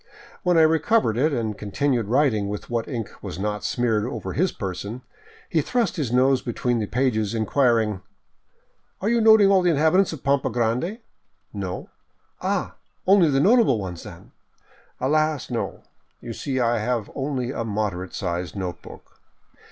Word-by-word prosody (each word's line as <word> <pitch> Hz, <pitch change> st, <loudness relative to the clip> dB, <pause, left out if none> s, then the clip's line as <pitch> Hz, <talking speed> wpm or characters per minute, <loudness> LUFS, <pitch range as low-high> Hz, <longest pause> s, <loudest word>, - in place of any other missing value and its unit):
When 180 Hz, -2 st, +2 dB
I 160 Hz, -, +7 dB
recovered 160 Hz, -, +3 dB
it 145 Hz, +7 st, +2 dB
and 115 Hz, -5 st, -2 dB
continued 115 Hz, +3 st, -1 dB
writing 115 Hz, -5 st, +2 dB
with 105 Hz, +3 st, -6 dB
what 115 Hz, -1 st, -1 dB
ink 115 Hz, -6 st, -4 dB
was -, -, -6 dB
not 105 Hz, +1 st, -3 dB
smeared 115 Hz, -4 st, 0 dB
over 125 Hz, +5 st, -4 dB
his 180 Hz, +3 st, +1 dB
person, 100 Hz, +5 st, -5 dB, 0.4 s
he -, -, +1 dB
thrust 235 Hz, -7 st, 0 dB
his 145 Hz, -, -2 dB
nose 130 Hz, +1 st, +3 dB
between 120 Hz, 0 st, -1 dB
the 105 Hz, -, -2 dB
pages, 115 Hz, -4 st, 0 dB
inquiring: 110 Hz, -3 st, +1 dB, 0.5 s
" -, -, -43 dB
Are 205 Hz, -, 0 dB
you 235 Hz, 0 st, +2 dB
noting 220 Hz, -3 st, +7 dB
all 190 Hz, -1 st, +5 dB
the 180 Hz, -, +2 dB
inhabitants 165 Hz, +5 st, +3 dB
of 155 Hz, -5 st, -8 dB
Pampa 140 Hz, 0 st, +1 dB
Grande? 125 Hz, -, -1 dB, 0.2 s
" -, -, -48 dB
" -, -, -45 dB
No." 90 Hz, -, -6 dB, 0.3 s
" -, -, -42 dB
Ah, -, -, -2 dB, 0.3 s
only 185 Hz, -4 st, +5 dB
the 135 Hz, -1 st, +2 dB
notable 210 Hz, -, +4 dB
ones, 90 Hz, -4 st, -5 dB
then? -, -, -12 dB, 0.2 s
" -, -, -33 dB
" -, -, -33 dB
Alas, 155 Hz, +1 st, 0 dB
no; -, -, -3 dB, 0.4 s
you 120 Hz, -1 st, -7 dB
see 130 Hz, +2 st, -3 dB
I 120 Hz, -1 st, +2 dB
have 115 Hz, -1 st, -2 dB
only 135 Hz, -3 st, -2 dB
a 115 Hz, -, -3 dB
moderate 100 Hz, -5 st, -3 dB
sized 90 Hz, 0 st, -3 dB
note 90 Hz, -3 st, -4 dB
book." -, -, -14 dB
125 Hz, 175 wpm, -24 LUFS, 105-155 Hz, 0.5 s, I